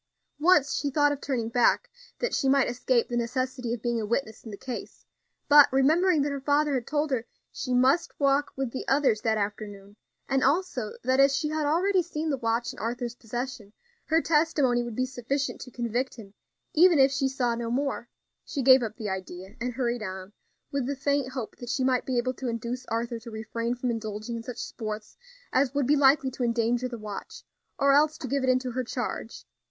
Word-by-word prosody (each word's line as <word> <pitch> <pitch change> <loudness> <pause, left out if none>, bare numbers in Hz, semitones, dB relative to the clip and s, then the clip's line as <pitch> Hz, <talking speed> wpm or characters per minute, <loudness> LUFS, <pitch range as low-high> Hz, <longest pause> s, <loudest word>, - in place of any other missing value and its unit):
Once 300 -3 +4
she 285 - -1
thought 290 +1 +3
of 285 - -4
turning 245 -5 -2
back, 240 +1 +2 0.3
that - - -2
she 270 - +1
might 275 -1 +4
escape 245 0 +1
the 240 - -4
necessity 250 +1 -2
of 235 -2 -4
being 235 -2 0
a - - -2
witness 225 -1 -2
in 225 - -9
the 200 - -7
case; 250 +2 -7 0.4
but, 290 -1 +8
remembering 310 +5 +3
that 290 - -1
her 280 -1 -4
father 285 -1 +2
told 295 +4 -1
her 245 -2 -1 0.2
she 255 - -5
must 270 +8 +2
walk 280 0 +2
with 270 -3 -2
the 260 - -4
others 270 -6 +2
that 220 -1 +1
afternoon, 205 -1 -5 0.3
and 270 -1 +1
also 280 - 0
that, 260 +2 +2
as 275 0 +5
she 300 - -1
had 310 -1 -1
already 365 +5 +2
seen 315 -2 -3
the 275 - 0
watch 230 0 -1
in - - -12
Arthur's 240 +1 -3
possession, 240 -2 -6 0.3
her 325 +1 +2
testimony 300 -6 +2
would 240 -2 -5
be 255 - +1
sufficient 260 +2 -3
to 255 - -8
convict 240 +1 -2
him 205 -4 -12 0.4
even 345 +1 +6
if 270 0 +5
she 275 0 +1
saw 255 -3 0
no 230 0 -3
more, 255 -1 -2 0.3
she 275 - -3
gave 260 0 +7
up 220 -2 -4
the 220 -3 -4
idea, 190 0 -6
and 245 +1 -2
hurried 240 -1 -1
on, 190 -1 -6 0.4
with 275 -3 -1
the 280 - -2
faint 275 -1 -1
hope 250 -5 -5
that 245 - -8
she 260 +1 0
might 255 -1 +1
be 255 -2 0
able 255 +2 0
to 260 0 -6
induce 235 +2 -4
Arthur 235 +1 -2
to 230 +1 -10
refrain 230 +2 -3
from 245 0 -2
indulging 220 0 -4
in 230 - -4
such 240 +1 -8
sports 215 -1 -6 0.4
as 270 +1 +2
would 285 -2 +2
be 290 +4 +4
likely 275 -1 +4
to 255 - -8
endanger 235 +1 +1
the 245 -1 -6
watch; 210 -2 -8 0.3
or 280 0 +4
else 305 +2 +4
to 280 - -6
give 275 +2 0
it 260 - +1
into 255 0 +1
her 255 +2 -2
charge. 245 -2 -5
255 Hz, 210 wpm, -27 LUFS, 230-280 Hz, 0.4 s, but